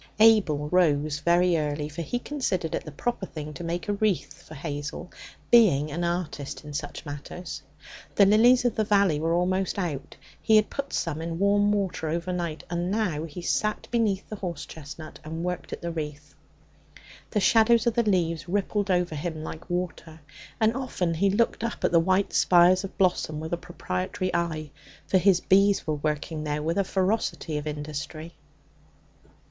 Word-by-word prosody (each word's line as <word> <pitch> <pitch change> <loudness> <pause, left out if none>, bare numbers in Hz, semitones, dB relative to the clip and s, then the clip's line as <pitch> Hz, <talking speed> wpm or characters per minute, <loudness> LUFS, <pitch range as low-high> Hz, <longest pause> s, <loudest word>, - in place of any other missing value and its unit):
Abel 205 -10 +5
rose 155 -4 +2
very 175 +2 +3
early, 150 0 -2
for 155 +3 -6
he 205 +9 -2
considered 240 - -2
it - - -2
the 155 - -7
proper 210 +6 -3
thing 150 -1 -7
to 175 - -7
make 170 +4 -3
a 205 - +1
wreath 195 -6 -1
for - - -12
Hazel, 145 +3 -5 0.4
being 160 -11 +5
an 170 +4 -2
artist 170 -5 -3
in 150 - -8
such 145 0 -5
matters. 150 +2 -7 0.5
The 200 - +7
lilies 240 +5 +5
of 240 - +2
the 220 - +1
valley 200 -7 +3
were 165 +2 +1
almost 185 +2 0
out; 170 -8 -4 0.3
he 220 - +4
had 215 -1 +4
put 280 0 -4
some 160 -2 -2
in 165 0 -4
warm 205 +2 +3
water 195 -6 -1
overnight, 170 -1 -3
and 175 +1 -2
now 185 -7 -1
he 165 +2 -8
sat 215 +4 -1
beneath 215 -5 +1
the 215 - -6
horse 175 -6 -5
chestnut 155 +1 -10
and 160 +2 -5
worked 180 -1 -4
at - - -6
the 170 - -2
wreath. 150 -2 -6 1.0
The 210 - 0
shadows 225 +2 +4
of 235 - +2
the 235 - +3
leaves 175 -6 0
rippled 205 +1 0
over 180 -2 +1
him 155 +1 -4
like 160 +2 -8
water, 175 -3 -4 0.4
and 220 0 +3
often 190 -10 -1
he 195 +5 +2
looked 225 +2 +1
up 230 - -4
at - - +2
the 170 - +5
white 185 +3 +1
spires 180 +1 +5
of 195 - -8
bloom 180 -5 +1
with 160 +2 -5
a - - +1
proprietary 170 - -3
eye, 160 -4 -2 0.3
for 190 - +3
his 185 -1 +4
bees 195 +1 +3
were 155 - 0
working 150 +1 -2
there 150 0 -2
with 165 +5 0
a - - +3
ferocity 190 -5 -1
of 150 - -7
industry. 150 +2 -5
175 Hz, 180 wpm, -26 LUFS, 155-200 Hz, 1.0 s, The